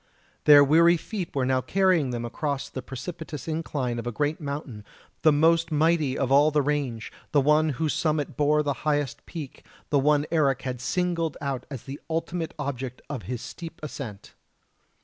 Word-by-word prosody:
Their 145 -1 +9
weary 165 +4 +5
feet 185 -2 -6
were 135 -2 +1
now 130 0 +2
carrying 180 -1 +2
them 120 -1 -3
across 140 +3 -3
the 130 - -5
precipitous 155 +2 -7
incline 145 -7 -2
of 115 - -5
a - - -1
great 145 +6 -1
mountain, 140 -7 -5 0.4
the 155 - +6
most 165 +2 +3
mighty 155 -3 +2
of 135 -1 -1
all 145 +2 +6
the 150 -1 +2
range, 135 -6 -2 0.2
the 145 - +5
one 150 +3 +4
whose 160 -2 0
summit 155 -3 -1
bore 150 +1 +3
the 145 -1 0
highest 145 -5 -1
peak, 155 -6 -8 0.3
the 145 - +4
one 145 +1 +3
Eric 140 -5 +2
had 125 -2 -4
singled 170 0 -1
out 135 -3 -3
as 135 -6 -7
the 140 +1 -7
ultimate 165 +1 -3
object 130 -3 -5
of 135 -5 -4
his 125 -2 -4
steep 165 -1 -8
ascent. 125 -9 -7
145 Hz, 175 wpm, -26 LUFS, 135-160 Hz, 0.4 s, Their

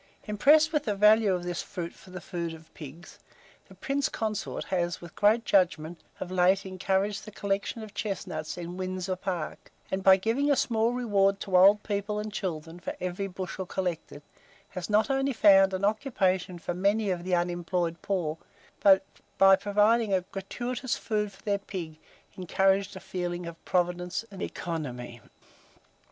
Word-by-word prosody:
Impressed 300 +10 +4
with 300 -1 +1
the 210 -3 0
value 210 +1 +5
of 180 -1 -1
this 175 -1 -3
fruit 170 -3 -6
for 190 - -17
the 185 0 -7
food 170 -2 -5
of 160 0 -17
pigs, 160 +3 -11 0.5
the - - -15
Prince 275 0 -1
Consort 215 -2 -3
has, 175 -2 -1
with 170 -1 -11
great 220 +3 +3
judgment, 170 -3 +1 0.2
of 185 - -5
late 185 +2 +3
encouraged 190 +2 -1
the 215 - -9
collection 200 +2 -3
of 210 -1 -10
chestnuts 185 -7 -4
in 175 +1 -6
Windsor 185 0 -3
Park, 180 -3 -5 0.2
and 190 - -1
by 190 0 +7
giving 230 +9 0
a 285 - +5
small 235 -3 +1
reward 200 -5 +2
to 190 - -2
old 200 +3 +6
people 205 0 -2
and 210 0 -4
children 170 -4 -4
for - - -5
every 185 +2 -3
bushel 185 0 -6
collected, 175 -6 -4 0.5
has 180 -1 -6
not 215 +6 +3
only 270 0 +1
found 195 -3 +6
an 190 +1 -1
occupation 195 -5 0
for 175 - -4
many 200 +3 +1
of 175 -1 -3
the 180 0 +1
unemployed 175 -1 -1
poor, 165 -5 -2 0.4
but, 195 -1 +5 0.3
by 195 0 +7
providing 210 +1 +2
a 185 - +1
gratuitous 240 +7 -4
food 210 -2 -2
for 195 - -19
their 200 -1 0
pig, 170 -6 -7 0.4
encouraged 190 +2 +1
a - - -6
feeling 180 -2 -4
of 170 -1 -9
providence 180 +2 -1
and 195 - -9
economy. 125 -8 -5
190 Hz, 165 wpm, -28 LUFS, 175-210 Hz, 0.5 s, by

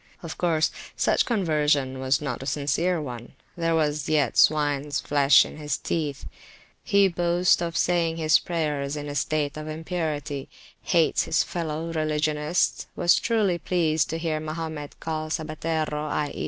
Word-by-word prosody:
Of 165 - -6
course, 160 -3 +1 0.3
such - - +2
conversion 150 - +1
was 130 +3 +1
not 135 -4 -3
a 135 - -6
sincere 150 +5 0
onethere 145 +5 -4
was 150 -2 0
yet 145 -6 +2
swines 145 -1 +2
flesh 140 -1 +5
in - - -10
his 150 -1 -2
teeth. 150 -4 -3 0.6
He 200 -2 +4
boasts 175 0 +2
of 170 -1 -2
saying 170 -2 +1
his 155 -2 +4
prayers 150 -4 -2
in 145 0 -5
a 145 - -5
state 150 0 -1
of 155 0 -6
impurity, 155 -4 -4 0.3
hates 170 -3 +2
his - - +2
fellow 165 -1 -4
religionists, 155 +1 0
was 175 0 +4
truly 210 -7 +1
pleased 160 -2 +1
to 165 - -2
hear 165 -2 -2
Mahomet 155 -1 -6
called 155 -1 -3
sabbatero, 155 -1 -2
i.e. 150 -1 -2
155 Hz, 145 wpm, -25 LUFS, 150-165 Hz, 0.6 s, flesh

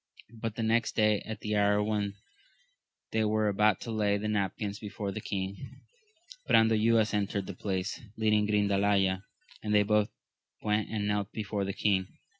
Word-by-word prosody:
But 115 -1 -5
the 115 - -2
next 115 +1 +1
day, 105 -2 +3
at 110 0 -6
the 105 0 -1
hour 105 0 +3
when 105 -1 -1 1.0
they 110 0 +1
were 110 0 +1
about 105 0 +3
to 115 - -5
lay 105 -2 +1
the 105 +1 -3
napkins 100 0 -2
before 105 -1 -5
the 110 - -5
king, 95 -1 -5 0.7
Brandoyuas 110 0 +4
entered 100 -1 -1
the 100 - -6
palace, 95 +1 -3 0.2
leading 105 -1 +2
Grindalaya, 100 -2 +2 0.4
and 105 -1 0
they 105 - +6
both 105 0 +2 0.5
went 105 0 0
and 105 -2 -2
knelt 105 0 -1
before 105 -2 -3
the 100 - -3
king. 95 -3 +1
105 Hz, 160 wpm, -30 LUFS, 100-110 Hz, 1.0 s, they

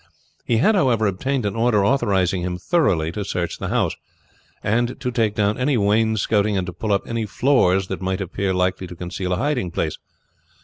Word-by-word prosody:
He 115 - +2
had, 180 - +4
however, 125 - +2
obtained 125 +6 -1
an 100 - -2
order 115 -3 +2
authorizing 95 -8 +1
him 90 0 -3
thoroughly 90 - +1
to 105 +3 -4
search 90 -3 -3
the - - -3
house, - - 0 0.7
and 120 +4 0
to 125 - -2
take 110 -4 0
down 105 +2 +1
any 130 +1 +2
wainscotting, 105 -1 +2
and 95 - -1
to 90 - -6
pull 110 +3 -3
up 100 - +1
any 115 -2 -2
floors 100 -8 +2
that - - -5
might 95 +1 -1
appear 100 0 -2
likely 90 0 0
to 90 - -9
conceal 90 +1 -4
a - - 0
hiding 130 -6 -1
place. - - -3
105 Hz, 190 wpm, -22 LUFS, 95-120 Hz, 0.7 s, had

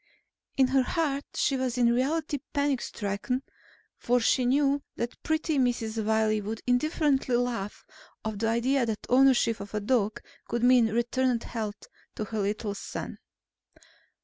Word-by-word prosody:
In 265 -1 +4
her 265 0 +4
heart 285 0 -1
she 275 - +1
was 255 -1 -1
in 235 -1 +4
reality 290 +4 0
panic 285 -3 +1
stricken 210 +6 -3 0.6
for 245 +1 +2
she 245 +2 +2
knew 280 +2 +2
that 235 +1 -4
pretty 315 -2 0
Mrs. 230 -3 0
Wiley 215 0 +2
would 215 +2 -4
indifferently 270 0 +1
laugh 240 -5 -2 0.4
off 215 -2 -3
the 225 - 0
idea 245 +4 +2
that 220 -2 -3
ownership 250 -3 +4
of 200 +1 -7
a - - +1
dog 215 0 0 0.3
could 235 0 -2
mean 245 -2 +6
returned 240 +2 0
health 215 -2 -5 0.3
to - - -3
her 220 +1 -4
little 205 +1 -1
son. 200 - -6
245 Hz, 145 wpm, -28 LUFS, 220-270 Hz, 0.6 s, mean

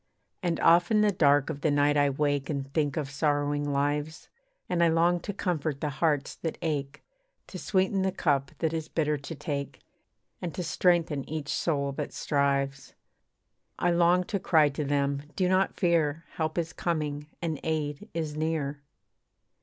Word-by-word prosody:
And 175 -3 -1
oft 170 +1 +5
in 215 -1 +4
the 210 -1 +4
dark 145 -4 +3
of 140 -2 -7
the 155 - +2
night 145 0 +3
I 145 -1 +4
wake 145 0 0
And 140 -2 -4
think 145 -3 0
of 145 -3 -2
sorrowing 145 0 0
lives, 145 +2 -1 0.4
And 175 -2 +1
I - - +6
long 170 +2 +3
to 205 - -5
comfort 160 -7 -2
the 150 0 -2
hearts 150 -4 +1
that 160 - -4
ache, 145 -4 -3 0.4
To 185 - -8
sweeten 190 0 +1
the 190 0 +1
cup 140 -7 +1
that 160 -1 -1
is 160 -1 -3
bitter 150 -2 0
to 140 +4 -7
take, 140 -1 -4 0.6
And 175 -3 -4
to 180 - -3
strengthen 165 -4 +2
each 150 -2 -4
soul 140 -4 0
that 145 +1 -5
strives. 140 -1 -1 0.8
I 175 - +2
long 175 +1 +4
to 200 +2 -2
cry 160 -5 +4
to 145 +2 -3
them 140 0 0
'Do 185 - +1
not 185 +1 +2
fear, 165 -3 +2
Help 155 0 -3
is 165 -1 -1
coming 150 -3 -2
and 160 -4 -3
aid 150 -2 -2
is 155 -3 -2
near.' 155 -2 -2
155 Hz, 170 wpm, -28 LUFS, 145-170 Hz, 0.8 s, I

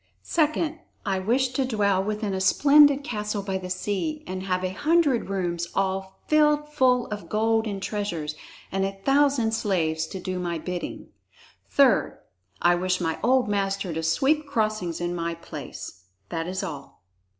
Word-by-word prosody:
"Second, 315 0 0 0.3
I 195 -2 0
wish 245 +7 +1
to 260 +2 0
dwell 200 -6 +1
within 210 0 -2
a 190 - -2
splendid 285 +7 +6
castle 210 -5 -3
by 190 -1 -2
the 185 -1 -7
sea 205 - -2
and 185 0 -5
have 185 -1 -1
a 185 0 -2
hundred 295 - +2
rooms 175 -3 -2
all 190 0 -1
filled 300 -1 +3
full 255 -4 +3
of 205 -5 -6
gold 225 +1 +1
and 200 -2 -3
treasures, 190 -7 -3 0.4
and 195 0 0
a 195 0 -3
thousand 275 -4 +3
slaves 165 -8 0
to 190 - -6
do 185 0 -3
my 175 -1 -2
bidding. 175 +2 -5 0.6
"Third, - - +3 0.5
I 175 - +6
wish 180 +1 0
my 165 -2 -2
old 255 0 +3
master 195 -3 -1
to 160 - -2
sweep 280 - +1
crossings 215 - -1
in 175 0 -1
my 170 -1 -2
place. 145 - -9 0.3
That 165 0 -3
is 190 +2 -3
all." 145 - -8
195 Hz, 160 wpm, -25 LUFS, 180-250 Hz, 0.6 s, splendid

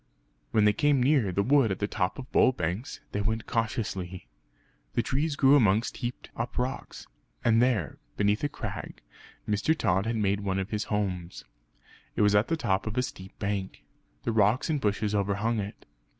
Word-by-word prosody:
When 110 -2 +3
they 105 - +5
came 145 +1 +3
near 130 -8 +3
the 100 +3 +1
wood 135 -2 +4
at 95 - -1
the 100 - -1
top 95 -3 -1
of 135 -1 -9
Bull 130 - +5
Banks, 90 - -3
they 105 - -1
went 110 +2 -1
cautiously. 95 - -3 0.7
The - - +2
trees 145 +2 0
grew 140 0 +6
amongst 110 -3 +3
heaped 120 -1 -5
up 120 +1 -4
rocks; 125 +1 -3 0.4
and 115 0 +5
there, 120 -10 +1 0.2
beneath 105 +3 +1
a 145 - +1
crag - - -6 0.5
Mr. 105 +10 +1
Tod 95 -1 +1
had 115 - 0
made 100 -2 +1
one 95 -2 -1
of 95 +2 -3
his 105 -1 -1
homes. 95 -5 -3 0.7
It - - +2
was 105 0 +4
at 105 +2 +4
the 165 - 0
top 95 -9 0
of 110 +3 -4
a 125 - +3
steep 95 -6 -8
bank; 100 -2 -3 0.4
the - - 0
rocks 110 +7 +2
and 150 -3 0
bushes 105 0 0
overhung 105 +3 0
it. 100 0 -6
105 Hz, 185 wpm, -28 LUFS, 100-125 Hz, 0.7 s, grew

